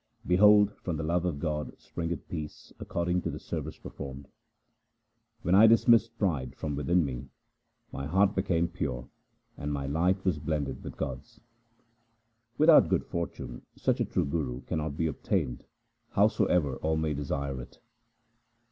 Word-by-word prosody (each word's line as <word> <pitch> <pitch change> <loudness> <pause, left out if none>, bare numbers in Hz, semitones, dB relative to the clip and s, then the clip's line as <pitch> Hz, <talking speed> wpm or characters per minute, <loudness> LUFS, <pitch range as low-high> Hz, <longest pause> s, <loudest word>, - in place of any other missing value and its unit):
Behold, 105 +2 +6
from 85 -4 -3
the 80 - -3
love 85 +3 0
of 85 -5 -1
God 75 -2 -3
springeth 85 0 -5
peace 75 -3 -7
according 90 +1 -1
to - - -3
the - - -5
service - - -5
performed. 70 0 -8 1.2
When 90 - +1
I 105 +4 +8
dismissed 115 +1 +4
pride 80 - -1
from 75 -2 -3
within 85 +4 +2
me, 65 0 -5 0.6
my 70 0 -4
heart 95 +5 +3
became 90 -4 +1
pure, 70 -8 -4 0.5
and 75 - -3
my 70 -1 -2
light 90 +7 +1
was 90 -6 +1
blended 75 -1 -3
with - - -8
God's. 65 0 -6 1.2
Without 155 +1 +7
good - - +1
fortune 65 -7 -5
such - - 0
a - - +2
trueGuru 70 -4 -2
cannot 75 -2 -3
be 80 - +1
obtained, 65 -5 -2 0.5
howsoever 75 -7 +2
all 80 0 0
may 80 -1 0
desire 70 -2 -3
it. - - -13
80 Hz, 145 wpm, -29 LUFS, 70-90 Hz, 1.2 s, I